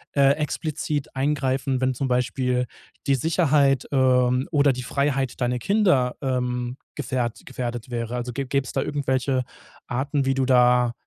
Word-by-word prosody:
äh, 140 Hz, -1 st, +5 dB
explizit 150 Hz, -1 st, -3 dB
eingreifen, 135 Hz, -1 st, 0 dB
wenn 130 Hz, 0 st, +2 dB
zum 135 Hz, +2 st, -2 dB
Beispiel 125 Hz, 0 st, 0 dB, 0.4 s
die 140 Hz, -, +4 dB
Sicherheit, 145 Hz, -3 st, +2 dB
ähm, 130 Hz, -1 st, +3 dB
oder 145 Hz, -3 st, +4 dB
die 125 Hz, -, -5 dB
Freiheit 135 Hz, 0 st, -1 dB
deiner 125 Hz, 0 st, 0 dB
Kinder, 180 Hz, -, +2 dB
ähm, 125 Hz, -2 st, -2 dB, 0.2 s
gefährt 125 Hz, -4 st, -2 dB
gefährdet 120 Hz, -1 st, -5 dB
wäre? 120 Hz, 0 st, -3 dB
Also 125 Hz, 0 st, -3 dB
gä 140 Hz, +3 st, -3 dB
gäbe 140 Hz, 0 st, 0 dB
es -, -, -7 dB
da -, -, 0 dB
irgendwelche 130 Hz, -2 st, 0 dB, 0.4 s
Arten, 140 Hz, +3 st, -1 dB
wie 135 Hz, -, +2 dB
du 135 Hz, 0 st, 0 dB
da 125 Hz, -2 st, +4 dB
130 Hz, 150 wpm, -24 LUFS, 125-140 Hz, 0.4 s, äh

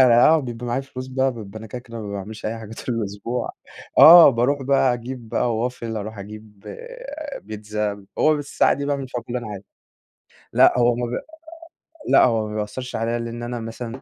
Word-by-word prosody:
آه، 130 Hz, +5 st, +6 dB
بيبقى 120 Hz, -2 st, -6 dB
معايا 120 Hz, +3 st, -1 dB
فلوس 130 Hz, -1 st, -8 dB
بقى، 130 Hz, 0 st, 0 dB
بيبقى 110 Hz, -2 st, -9 dB
أنا 110 Hz, -, -9 dB
كده، 125 Hz, +4 st, -6 dB
كده 115 Hz, -2 st, -9 dB
ما 100 Hz, -2 st, -6 dB
باعملش 105 Hz, +2 st, -6 dB
أي 115 Hz, +1 st, -3 dB
حاجة 110 Hz, 0 st, -9 dB
طول 125 Hz, -, -1 dB
الأسبوع. 110 Hz, +3 st, -3 dB, 0.5 s
آه، 165 Hz, -2 st, +11 dB
باروح 135 Hz, +4 st, 0 dB
بقى 135 Hz, -2 st, +3 dB
أجيب 120 Hz, -1 st, -7 dB
بقى 120 Hz, +1 st, 0 dB
Waffle 115 Hz, -3 st, -6 dB
أروح 110 Hz, +1 st, -6 dB
أجيب 105 Hz, 0 st, -11 dB, 0.8 s
بيتزا، 105 Hz, -1 st, -4 dB
هو 155 Hz, 0 st, +4 dB
بس 145 Hz, -1 st, -6 dB
الساعة -, -, +4 dB
دي 140 Hz, -, -3 dB
باعمل 140 Hz, -2 st, -2 dB
فيها 125 Hz, -, -4 dB
كل -, -, -36 dB
اللي -, -, +1 dB
أنا 120 Hz, -3 st, -7 dB
عايزه. 100 Hz, -1 st, -8 dB, 0.9 s
لأ، -, -, +6 dB
هو 120 Hz, 0 st, +4 dB
ما 120 Hz, 0 st, -2 dB
بي 120 Hz, -, -3 dB, 0.9 s
لأ، -, -, +6 dB
هو 110 Hz, -3 st, +1 dB
ما 105 Hz, -, -6 dB
بيأثرش 110 Hz, +4 st, -4 dB
عليا 115 Hz, +1 st, -1 dB
لإن 115 Hz, 0 st, -5 dB
أنا 120 Hz, 0 st, -4 dB
مثلًا 115 Hz, +2 st, -7 dB
115 Hz, 195 wpm, -22 LUFS, 110-125 Hz, 0.9 s, آه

